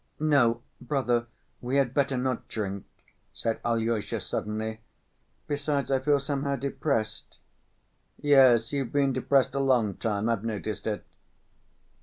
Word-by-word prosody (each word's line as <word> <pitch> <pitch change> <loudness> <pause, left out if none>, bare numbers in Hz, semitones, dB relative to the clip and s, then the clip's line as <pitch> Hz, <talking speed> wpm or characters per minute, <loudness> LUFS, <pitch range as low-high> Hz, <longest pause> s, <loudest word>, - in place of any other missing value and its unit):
"No, 140 -7 +3 0.2
brother, 125 -3 0 0.3
we 125 +3 0
had 135 -3 +2
better 140 -2 +1
not 130 -1 -2
drink," 100 -2 -4 0.5
said 115 -1 -2
Alyosha 115 -2 0
suddenly. 110 +1 -3 0.7
"Besides 145 -2 -1
I 135 - +3
feel 145 +2 +3
somehow 140 0 -1
depressed." 135 -4 -2 0.8
"Yes, 130 -5 +5
you've 135 -4 -1
been 140 -2 +2
depressed 135 -1 +2
a 140 - -1
long 125 -7 +2
time, 105 +1 -1
I've 115 -3 0
noticed 110 -1 -4
it." 105 -1 -3
125 Hz, 125 wpm, -28 LUFS, 110-140 Hz, 0.8 s, Yes